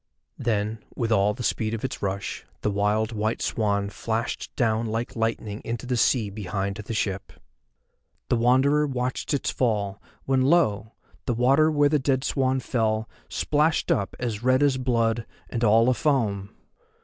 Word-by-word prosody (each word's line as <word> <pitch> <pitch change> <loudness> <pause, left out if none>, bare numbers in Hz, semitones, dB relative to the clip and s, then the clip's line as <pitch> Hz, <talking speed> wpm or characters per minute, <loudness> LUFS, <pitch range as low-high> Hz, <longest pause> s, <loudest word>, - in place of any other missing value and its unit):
Then, 110 -1 -1
with 115 -2 -1
all 105 -1 +3
the 125 - -6
speed 110 -1 0
of 115 - -4
its 130 - -5
rush, 100 0 -3 0.2
the 105 - 0
wild 105 +3 +1
white 110 0 -1
swan 100 -2 0
flashed 115 +3 -3
down 115 -1 +1
like 115 +2 -3
lightning 110 -2 -2
into 115 +2 -4
the 125 0 -1
sea 115 -3 +2
behind 100 -1 -3
the 105 +2 -6
ship. 95 -2 -2 1.0
The - - +2
Wanderer 130 +5 +3
watched 130 -1 -2
its 145 - 0
fall, 105 -5 -1 0.2
when, 135 -1 +2
lo! 130 - +2 0.3
the 120 - +1
water 135 +6 +4
where 145 -2 +3
the 150 0 +2
dead 130 -1 +1
swan 130 -2 +1
fell 110 -3 0 0.2
splashed 155 +2 +1
up 100 -1 0
as 115 -4 -3
red 130 +3 +3
as 140 -2 +3
blood 115 -2 0 0.2
and 120 -1 -2
all 115 +1 +5
afoam! 120 -7 +1
115 Hz, 160 wpm, -25 LUFS, 105-130 Hz, 1.0 s, all